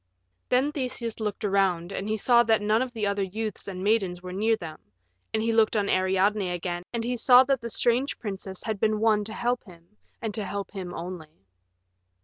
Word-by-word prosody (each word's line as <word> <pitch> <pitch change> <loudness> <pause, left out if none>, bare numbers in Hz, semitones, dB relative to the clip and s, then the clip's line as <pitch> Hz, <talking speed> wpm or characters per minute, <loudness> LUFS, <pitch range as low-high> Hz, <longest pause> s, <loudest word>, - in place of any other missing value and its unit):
Then 260 +4 +3
Theseus 250 -6 -3
looked 210 0 -3
around, 190 -3 +1
and 200 +1 -4
he 215 - 0
saw 235 +3 +5
that 225 -1 +4
none 210 +2 +2
of 255 -1 -2
the 220 -3 -2
other 200 0 0
youths 210 +3 -4
and 185 -1 -5
maidens 195 -4 +1
were 180 0 -6
near 220 +4 +2
them, 165 -7 -8 0.5
and 220 0 0
he 230 - +1
looked 225 0 +3
on 205 -1 +1
Ariadne 190 +1 +2
again, 175 0 -3
and 235 -1 -2
he 245 +2 -1
saw 245 +2 +7
that 265 -2 0
the 235 - -5
strange 245 +4 +1
princess 195 -3 -6
had 220 -3 -3
been 215 0 +1
won 215 -1 +3
to 215 - -6
help 245 +2 -1
him, 170 -3 -16 0.3
and 220 -2 -4
to 215 - -1
help 200 +1 -5
him 185 -3 -6
only. 165 - -8
210 Hz, 205 wpm, -26 LUFS, 190-230 Hz, 0.5 s, saw